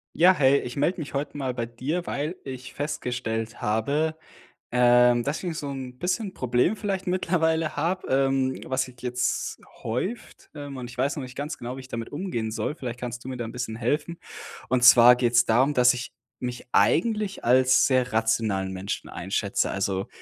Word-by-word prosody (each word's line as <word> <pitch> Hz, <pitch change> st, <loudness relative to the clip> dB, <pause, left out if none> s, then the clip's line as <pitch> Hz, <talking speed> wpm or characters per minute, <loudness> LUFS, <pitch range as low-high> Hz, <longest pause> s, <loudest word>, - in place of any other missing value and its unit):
Ja, 180 Hz, +3 st, +6 dB
hey, 140 Hz, -4 st, +4 dB
ich 125 Hz, -, -6 dB
melde 165 Hz, +6 st, 0 dB
mich 150 Hz, -, -6 dB
heute 145 Hz, +1 st, -3 dB
mal 130 Hz, -3 st, -2 dB
bei 120 Hz, -2 st, -3 dB
dir, 140 Hz, +9 st, -3 dB
weil 150 Hz, +5 st, -2 dB
ich 130 Hz, -1 st, -8 dB
festgestellt 120 Hz, -5 st, -3 dB
habe, 140 Hz, +9 st, 0 dB, 0.6 s
ähm, 120 Hz, 0 st, +5 dB
dass 145 Hz, +7 st, -3 dB
ich 175 Hz, -3 st, -3 dB
so 145 Hz, -, -4 dB
'n 130 Hz, -2 st, -7 dB
bisschen 185 Hz, -, -1 dB
Problem 125 Hz, -, +1 dB
vielleicht 195 Hz, -3 st, -3 dB
mittlerweile 165 Hz, -3 st, +1 dB
habe, 175 Hz, +5 st, -1 dB
ähm, 135 Hz, -1 st, +1 dB
was 130 Hz, 0 st, 0 dB
sich 125 Hz, -1 st, -15 dB
jetzt 125 Hz, 0 st, -2 dB, 0.2 s
häuft, 185 Hz, -, -4 dB
ähm, 145 Hz, -2 st, -7 dB
und 125 Hz, -1 st, -6 dB
ich -, -, -12 dB
weiß 135 Hz, +3 st, 0 dB
noch 145 Hz, -, -3 dB
nicht 125 Hz, -1 st, -9 dB
ganz 145 Hz, +2 st, -4 dB
genau, 120 Hz, +2 st, -5 dB
wie -, -, -7 dB
ich 130 Hz, -, -13 dB
damit 115 Hz, -2 st, -5 dB
umgehen 145 Hz, -, -3 dB
soll. 115 Hz, -, -2 dB
Vielleicht 125 Hz, -5 st, -6 dB
kannst 120 Hz, -1 st, -6 dB
du -, -, -5 dB
mir 130 Hz, -, -5 dB
da 120 Hz, -, -4 dB
'n 115 Hz, -, -7 dB
bisschen 120 Hz, -2 st, -4 dB
helfen. 150 Hz, +8 st, -1 dB, 0.5 s
Und 125 Hz, -1 st, +2 dB
zwar 125 Hz, 0 st, +9 dB
geht 120 Hz, -1 st, 0 dB
es 115 Hz, 0 st, +5 dB
darum, 130 Hz, +6 st, +3 dB
dass 125 Hz, 0 st, +6 dB
ich 125 Hz, 0 st, -6 dB, 0.3 s
mich 125 Hz, 0 st, -5 dB
eigentlich 210 Hz, +1 st, +2 dB
als 130 Hz, +1 st, +5 dB
sehr 130 Hz, -3 st, +1 dB
rationalen 110 Hz, -4 st, +1 dB
Menschen 95 Hz, +2 st, -5 dB
einschätze. -, -, -1 dB
Also, 95 Hz, +1 st, -1 dB
130 Hz, 190 wpm, -25 LUFS, 120-150 Hz, 0.6 s, zwar